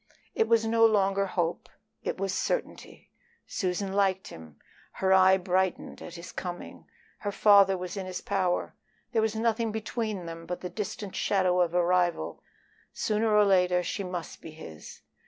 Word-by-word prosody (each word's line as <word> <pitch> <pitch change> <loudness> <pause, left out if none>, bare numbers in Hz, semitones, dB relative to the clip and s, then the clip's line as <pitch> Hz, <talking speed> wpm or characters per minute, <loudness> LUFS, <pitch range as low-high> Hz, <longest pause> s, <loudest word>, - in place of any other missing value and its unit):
It 225 - +1
was 225 -1 +3
no 225 0 +3
longer 200 -3 +3
hope, 175 -2 -2 0.3
it - - -3
was 195 0 -2
certainty. - - -4 0.3
Susan 190 +1 -2
liked 190 -1 +1
him; 80 -3 -12 0.4
her 190 0 +2
eye 190 0 +6
brightened 185 0 -1
at 175 - -9
his 170 +1 -9
coming; 175 -1 -7 0.3
her 205 - -3
father 200 -2 +5
was 180 +1 -6
in 190 -2 -4
his 185 -1 -4
power. 185 -3 -1 0.4
There 225 - +2
was 220 0 0
nothing 225 0 0
between 215 -3 -3
them 165 0 -8
but 180 - -4
the 180 - -5
distant 205 -2 -5
shadow 185 -2 +2
of 175 -1 0
a 175 -1 +3
rival; 180 -1 0 0.5
sooner 215 +1 0
or 210 0 +5
later 180 -2 +3
she 195 +3 -3
must 180 -2 -6
be - - -9
his. 120 - -11
190 Hz, 165 wpm, -28 LUFS, 180-210 Hz, 0.5 s, eye